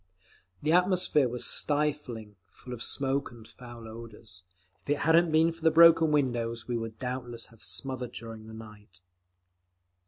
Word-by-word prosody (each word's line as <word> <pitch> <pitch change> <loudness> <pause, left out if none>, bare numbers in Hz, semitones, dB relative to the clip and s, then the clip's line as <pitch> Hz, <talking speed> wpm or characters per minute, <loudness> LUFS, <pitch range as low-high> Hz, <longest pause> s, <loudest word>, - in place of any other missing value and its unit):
The 155 - +1
atmosphere 180 -6 +3
was 125 0 0
stifling, 145 -8 -2 0.2
full 125 - -10
of 120 - -8
smoke 140 +1 -1
and 115 -2 -14
foul 120 -2 -12
odours; 110 -4 -11 0.4
if - - -16
it 145 - +2
hadn't 165 +2 +4
been 160 +1 +4
for 165 0 -14
the 160 - +4
broken 165 -1 +6
windows 120 -5 -1
we 120 - -2
would 115 -1 -5
doubtless 125 -1 -5
have 115 - -20
smothered 120 +7 -2
during 110 -1 -9
the 110 - -11
night. 105 -5 -13
125 Hz, 155 wpm, -28 LUFS, 115-150 Hz, 0.4 s, broken